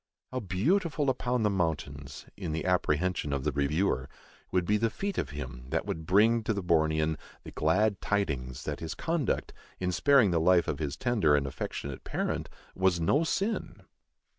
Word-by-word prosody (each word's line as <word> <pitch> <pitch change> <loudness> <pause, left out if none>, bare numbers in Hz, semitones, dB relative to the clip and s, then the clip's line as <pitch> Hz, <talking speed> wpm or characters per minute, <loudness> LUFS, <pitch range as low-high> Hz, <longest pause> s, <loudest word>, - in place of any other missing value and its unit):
"How 130 - -2
beautiful 145 - +1
upon 125 -2 -1
the 105 - +3
mountains," 70 -6 -3
in 80 - -4
the 80 - -2
apprehension 90 -3 +1
of 70 -2 -1
the 75 - +1
reviewer, 70 -1 0 0.4
"would 90 -2 +1
be 105 +3 +3
the 115 +2 +1
feet 200 - -3
of - - -2
him 65 -4 -7
that - - -1
would 80 -1 -4
bring" 110 +5 +5
to 110 - 0
the 100 - -3
Bornean 80 -2 +2 0.3
"the - - -9
glad 100 +6 +1
tidings" 70 -10 -1
that 75 - -4
his 80 -1 -5
conduct, 165 -5 -1 0.3
in 90 0 0
sparing 135 0 +4
the 85 - +2
life 90 0 +4
of 70 - -2
his 75 -2 -3
tender 105 -12 +3
and 70 -1 +1
affectionate 70 0 -5
parent, - - -2 0.2
was 95 -2 +2
no 135 - +3
sin! 200 +7 -2
90 Hz, 175 wpm, -29 LUFS, 75-110 Hz, 0.4 s, bring